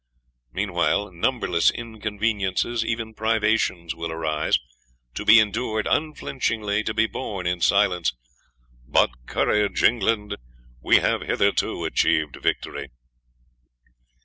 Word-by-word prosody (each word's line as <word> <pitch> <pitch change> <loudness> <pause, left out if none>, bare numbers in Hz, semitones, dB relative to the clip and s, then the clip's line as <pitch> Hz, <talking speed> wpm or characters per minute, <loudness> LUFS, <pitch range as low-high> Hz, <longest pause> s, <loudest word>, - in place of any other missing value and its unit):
Meanwhile 100 +3 0
numberless 90 -2 +1
inconveniences, 110 -1 -2
even 115 -1 -3
privations, 110 -6 0
will 85 0 -5
arise 80 -1 0 0.6
to - - -5
be 110 +2 +8
endured 110 0 0
unflinchingly 115 -8 -1
to 110 - -1
be 110 0 +3
borne 100 -6 -5
in 90 0 -1
silence. 90 -1 +2 0.8
But - - +3 0.2
courage, 105 -3 0
England, 105 -2 +1 0.4
we - - +4
have - - +2
hitherto - - 0
achieved 75 -3 +1
victory. - - -2
105 Hz, 100 wpm, -24 LUFS, 90-110 Hz, 0.8 s, be